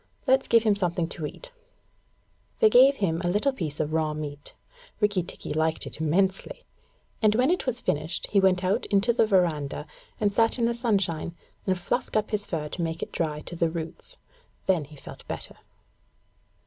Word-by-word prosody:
Let's 265 0 +3
give 230 -1 +5
him 215 -2 +3
something 175 -3 -1
to 155 -3 -4
eat.' - - -11 1.1
They 440 -2 +5
gave 270 +3 +7
him 170 -8 0
a 175 - +1
little 210 +9 +1
piece 155 - -4
of 155 0 -1
raw 155 -1 0
meat. 145 -1 -7 0.4
Rikki 205 -3 +2
tikki 170 - -6
liked 160 +1 0
it - - -7
immensely, 185 +5 0 0.6
and 215 -1 +4
when 255 +7 +3
it 360 - -1
was 245 -1 0
finished 155 +4 -1
he 200 - +4
went 190 -1 +3
out 185 +2 0
into 205 +4 +2
the 225 - +3
verandah 160 -7 +1 0.3
and 205 -2 +1
sat 225 +3 +4
in 235 - +1
the 235 - +1
sunshine 195 -9 -1 0.3
and 185 -1 +2
fluffed 180 +8 -2
up 215 +1 -1
his 210 -1 -1
fur 155 -3 -3
to 175 - -5
make 165 0 -2
it - - -7
dry 150 -3 -2
to 175 - -8
the 165 -1 +1
roots. 165 - -6 0.5
Then 180 -6 +2
he 150 +2 -14
felt 140 - -12
better. - - -6
185 Hz, 185 wpm, -26 LUFS, 160-220 Hz, 1.1 s, gave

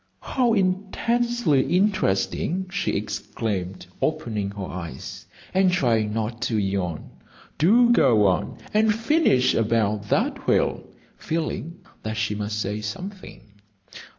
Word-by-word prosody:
"How 245 -3 +1
intensely 200 - +1 0.2
interesting!" 185 - 0
she 200 +1 -1
exclaimed, 100 -2 -3 0.2
opening 105 -4 -1
her 100 -1 -6
eyes, 85 -7 -7 0.3
and 190 -1 +4
trying 115 -10 +1
not 115 +2 -3
to 115 -2 0
yawn. 95 -5 -2 0.5
"Do 235 +9 +5
go 120 - +5
on, 90 -4 0 0.2
and 215 0 +3
finish 230 - +3
about 105 -2 0
that - - 0
whale," - - +1 0.3
feeling 165 +1 -4 0.2
that 110 0 -4
she 105 0 0
must 105 +1 -3
say 105 0 -2
something. 185 - -7
115 Hz, 115 wpm, -24 LUFS, -, 0.5 s, Do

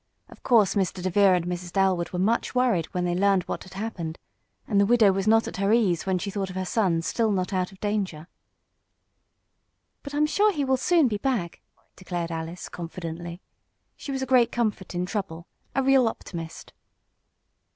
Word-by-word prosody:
Of - - -15
course 225 -5 +4
Mr. 190 -2 -1
DeVere 185 +1 +4
and 175 -1 -1
Mrs. 175 0 -5
Dalwood 190 -3 +1
were 180 - -5
much 220 +7 0
worried 240 -10 +2
when 180 -2 -2
they 175 - 0
learned 195 0 +2
what - - -5
had 190 - -13
happened, 180 -6 -4 0.5
and 200 -3 +3
the - - +4
widow 225 -3 +5
was 195 +1 -2
not 225 +1 +4
at - - -6
her 195 +1 +1
ease 195 -7 +2
when 190 -1 +2
she 200 +3 -4
thought 195 -1 -3
of 185 - -8
her 185 0 -2
son 180 -5 +1
still 225 +5 0
not 185 0 -1
out 185 0 -1
of 190 - -17
danger. 195 -7 -2 1.7
"But 285 0 -7
I'm 300 +1 +3
sure 415 +7 +3
he 295 -7 -1
will 265 0 +2
soon 330 +1 +3
be 210 -3 -2
back," 210 -9 -2 0.3
declared 175 -2 -4
Alice, 165 +2 -5
confidently. 170 0 -7 0.5
She 280 - -7
was 265 -1 -2
a - - -1
great 250 -2 +4
comfort 210 -6 -2
in 175 +1 -1
trouble 180 -4 -4 0.3
a 270 - +2
real 265 -2 +4
optimist. 165 -6 -7
195 Hz, 190 wpm, -26 LUFS, 175-225 Hz, 1.7 s, widow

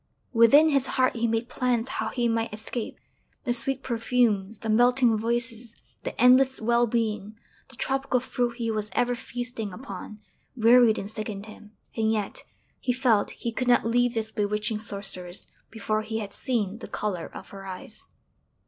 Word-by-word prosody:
Within 265 +7 +7
his 275 -3 +2
heart 255 -1 +3
he 235 0 +1
made 225 +1 -1
plans 245 -2 0
how 265 - -3
he 240 -2 0
might 225 0 0
escape. 220 +2 -5 0.5
The 245 - 0
sweet 265 +3 -1
perfumes, 230 -4 +1
the 225 - -7
melting 245 +1 +4
voices, 230 +1 -2 0.3
the - - -6
endless 260 +2 +5
well 235 +2 +3
being, 215 -2 -2 0.3
the - - -12
tropical 270 -1 0
fruit 245 -2 -2
he 230 -2 -1
was 215 -1 -2
ever 245 0 +2
feasting 240 -3 -5
upon, 210 0 -8 0.4
wearied 235 -1 +6
and 195 - -4
sickened 215 -1 -4
him; 215 0 -13 0.2
and 220 -1 +1
yet 210 -3 -2 0.4
he 250 - 0
felt 240 -5 +2
he 235 - -4
could 250 +2 -2
not 245 -2 +4
leave 245 +1 +2
this 220 -1 -1
bewitching 210 +1 -1
sorceress 195 -4 -3 0.2
before 215 -1 -1
he 220 +1 -4
had 205 -2 -5
seen 225 -5 -2
the - - -8
colour 190 -6 -3
of - - -10
her 195 -1 -10
eyes. 185 -1 -9
230 Hz, 165 wpm, -26 LUFS, 215-245 Hz, 0.5 s, Within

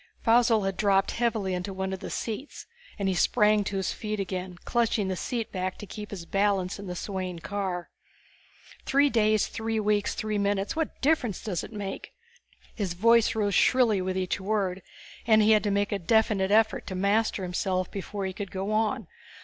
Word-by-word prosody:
Faussel 230 -2 +4
had 195 -1 -2
dropped 195 -2 +2
heavily 225 -5 0
into 180 +2 -3
one 190 0 -3
of 190 - -4
the - - -7
seats 230 +6 -5 0.3
and 200 -2 -1
he 190 - +2
sprang 210 +2 +3
to 195 0 -3
his 190 - -1
feet 215 -1 -4
again, 185 -1 -4
clutching 225 -4 +1
the 185 - -1
seat 230 +4 -3
back 185 -1 -3
to - - -8
keep 210 +1 -8
his 180 -5 -7
balance 195 -1 0
in 200 - -7
the 180 - -4
swaying 185 -1 -4
car. 185 -1 -4 0.9
"Three 280 +1 +3
days, 215 -2 +3
three 225 0 -2
weeks, 210 -1 +1
three 215 -1 -2
minutes 200 +2 0
what 320 -1 -3
difference 265 - +1
does 190 -7 -2
it - - -9
make?" 205 -3 -6 0.6
His 190 -6 -3
voice 230 +4 +4
rose 205 -2 0
shrilly 225 -2 +4
with 185 0 -2
each 185 +1 -1
word, 195 -2 -1 0.5
and 220 -1 +6
he 215 - +5
had 215 -1 +5
to - - +2
make 200 0 0
a 205 - -1
definite 205 0 +2
effort 220 +1 +2
to 185 - -4
master 200 +1 +1
himself 185 0 -1
before 200 0 -4
he 190 - -3
could 200 +1 -6
go 195 +2 -3
on. 215 0 0
205 Hz, 190 wpm, -27 LUFS, 190-220 Hz, 0.9 s, and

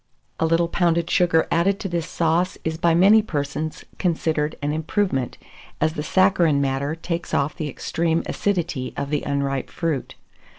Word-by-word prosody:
A 160 - +2
little 165 +1 +2
pounded 170 -1 +1
sugar 165 -2 +3
added 190 +4 +2
to - - -3
this 170 -3 -2
sauce 170 +2 +1
is 160 0 -3
by 170 -1 +3
many 200 +5 +6
persons 150 -4 -4
considered 160 -3 0
an 145 0 -1
improvement, 155 - -1 0.4
as 155 +1 +1
the 150 - -3
saccharine 170 -3 +3
matter 140 +2 -1
takes 170 +1 -3
off 140 +2 0
the 155 -4 -3
extreme 165 +4 -1
acidity 170 -10 -2
of 140 0 -3
the 150 - +1
unripe 140 -1 -2
fruit. 160 -6 -3
160 Hz, 160 wpm, -23 LUFS, 150-175 Hz, 0.4 s, many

